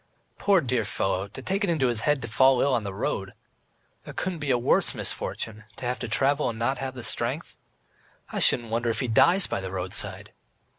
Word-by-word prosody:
"Poor, 195 -3 +4
dear 125 -4 0
fellow, 95 -1 -1
to 120 +6 -10
take 195 +6 -1
it 200 - +1
into 155 -6 +1
his 120 -3 +2
head 145 +1 +1
to - - -4
fall 130 +3 +4
ill 140 +1 +2
on 120 - +1
the 100 - -4
road. 95 - -3 0.7
There - - -10
couldn't 180 -3 -3
be 150 -2 -4
a 125 - +4
worse 120 - +2
misfortune, 110 -1 -4
to 135 - -7
have 125 +1 -2
to 125 - -4
travel 140 +5 +1
and 115 - -5
not 125 +3 -1
have 130 -1 -4
the 120 - -7
strength.... - - -3 0.8
I - - -2
shouldn't 115 -2 +5
wonder 115 +1 0
if 115 - -1
he 125 - -1
dies 175 - +5
by - - -3
the 95 - -5
roadside. 95 0 -4
125 Hz, 215 wpm, -26 LUFS, 110-140 Hz, 0.8 s, shouldn't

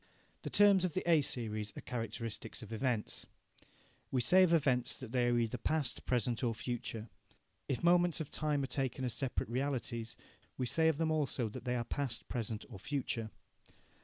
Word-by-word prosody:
The - - -4
terms 200 -3 +6
of 180 -4 -1
the 185 - -1
A 165 -3 +6
series 110 -6 -2
are - - -5
characteristics 115 0 -4
of 110 - -8
events. 115 -2 -1 0.8
We 130 - +1
say 185 +9 +6
of 185 -2 +5
events 135 -7 +3
that - - -8
they 125 -1 +2
are 120 0 +3
either 115 +1 0
past, 155 0 -1
present, 120 -1 +1
or 115 -2 +1
future. 115 -2 -4 0.6
If 135 - -1
moments 175 -1 +4
of 155 - -5
time 150 -2 0
are - - +1
taken 130 -1 -2
as 125 - -1
separate 135 -3 -1
realities, 120 -3 -2 0.4
we 130 - 0
say 160 +6 +3
of 160 -3 +3
them 160 0 +1
also 140 -7 0
that 110 - -8
they 125 0 0
are 120 - 0
past, 135 -4 -3
present, 115 -2 -3
or 105 -7 -10
future. 125 -3 -2
125 Hz, 185 wpm, -34 LUFS, 115-150 Hz, 0.8 s, terms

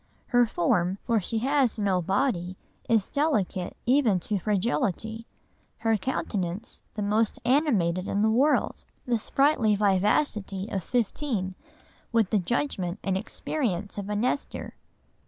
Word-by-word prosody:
her 245 -1 +4
form 175 -1 +1
(for 230 -3 +1
she 225 +5 -3
has 265 0 +2
no 195 -4 +1
body) 185 -1 0 0.3
is 220 -4 +3
delicate 210 - -1
even 245 -7 +3
to 200 +3 -2
fragility; 220 - -1 0.5
her 225 0 +1
countenance 200 -3 -3
the 210 - -2
most 215 +2 +1
animated 210 - +2
in 200 +1 0
the 220 - +3
world; 275 +7 +2 0.2
the 240 -3 +1
sprightly 260 -3 +2
vivacity 200 0 +1
of 190 -3 -2
fifteen, 230 -5 -1 0.6
with 225 -4 +2
the 215 - +3
judgment 190 -3 -1
and 190 -1 0
experience 205 - -2
of 200 0 -5
a 210 - -1
Nestor." 250 +6 -2
215 Hz, 130 wpm, -27 LUFS, 190-245 Hz, 0.6 s, her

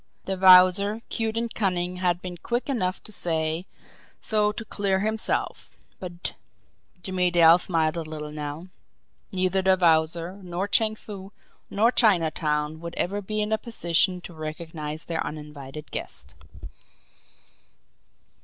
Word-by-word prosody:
The 190 - -2
Wowzer, 190 +3 +6
cute 225 0 -2
and 230 0 -2
cunning, 180 -3 -1
had 180 -1 0
been 180 -1 -6
quick 240 - -3
enough 190 -8 -1
to - - -6
say 160 -2 -1 0.5
so 210 -1 +3
to 225 +2 -7
clear 195 -3 0
himself, 220 +1 -2 0.2
but 175 -1 -5 0.7
Jimmie 185 -1 +1
Dale 170 0 +6
smiled 165 -2 0
a - - -1
little 155 -1 -7
now 150 +4 -6 0.6
neither 185 0 +1
the 190 0 +4
Wowzer, 165 +2 +2
nor 180 +2 -3
Chang 215 +1 +2
Foo, 200 -2 -10 0.4
nor 225 +4 +3
Chinatown 160 -8 +2
would 170 0 -7
ever 200 +3 -1
be 215 +2 -2
in 210 - -4
a 220 - +1
position 180 -4 0
to 175 - -10
recognise 155 -1 -5
their 165 -1 -2
uninvited 150 -1 -8
guest! 70 +4 -4
180 Hz, 135 wpm, -25 LUFS, 160-200 Hz, 0.7 s, Wowzer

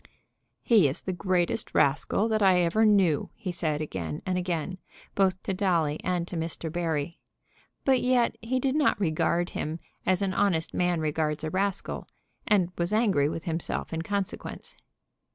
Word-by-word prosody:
"He 215 -10 +5
is 135 - -3
the 185 - -2
greatest 180 -1 0
rascal 150 +9 +2
that 215 -1 +1
I 185 -2 +5
ever 180 +6 +3
knew," 195 -8 +3
he 205 -5 -4
said 155 -4 -1
again 85 - -4
and 185 - 0
again, 180 0 -2 0.3
both 190 -2 +1
to 195 - -2
Dolly 170 -6 +1
and 180 -2 -1
to 180 - -7
Mr. 165 -1 -3
Barry. 165 -1 -2 0.7
But 265 -2 +4
yet 250 -2 +2
he 250 +3 -1
did 265 0 0
not 295 -7 +2
regard 175 0 +1
him 155 +2 -4 0.2
as 185 +1 +1
an 190 -1 0
honest 185 -5 +1
man 175 -2 +1
regards 150 0 -1
a 155 - -2
rascal, 195 0 -2 0.4
and 190 -4 +3
was 170 +2 0
angry 205 -10 +3
with 160 +1 -5
himself 165 -1 -3
in 165 - -1
consequence. 200 +2 -4
180 Hz, 165 wpm, -27 LUFS, 160-200 Hz, 0.7 s, He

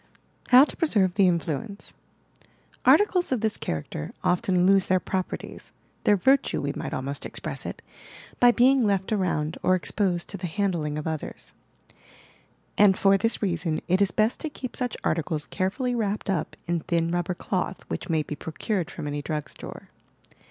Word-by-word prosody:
HOW 255 +2 +9
TO - - -8
PRESERVE 205 - +2
TIIE 195 -1 +4
INFLUENCE 175 +4 -3 0.9
Articles 375 -6 +4
of 250 -4 0
this 220 -2 0
character 75 -1 -5
often 180 0 +2
lose 195 0 +4
their 185 0 +3
properties 185 +1 -5
— - - -38
their 205 - +6
"virtue" 270 +9 +2
we 140 0 -2
might - - -5
almost 135 +2 -4
express - - -4
it - - -7 0.3
— - - -18
by 245 - +7
being 255 +2 +4
left 200 -2 0
around 170 -6 -1
or 185 - +3
exposed 180 +1 0
to 200 - -5
the 180 -1 -4
handling 170 -5 -1
of 150 - -4
others: 160 -2 -5 1.3
and 200 -2 +6
for 195 0 +4
this 225 +3 0
reason 170 -4 0
it 185 +3 +2
is 200 - +4
best 215 +3 +1
to 315 - -4
keep 255 -4 -7
such 250 -3 -3
articles 155 -1 -1
carefully 210 +7 -1
wrapped 215 -3 -1
up 165 -5 -2
in 175 0 0
thin 165 +1 0
rubber 175 +1 -1
cloth 185 0 -3
which - - -5
may 160 -2 +1
be 150 - -6
procured 170 +4 -3
from - - -7
any 145 0 -3
drug 150 0 -4
store. - - -10
185 Hz, 175 wpm, -26 LUFS, 165-210 Hz, 1.3 s, HOW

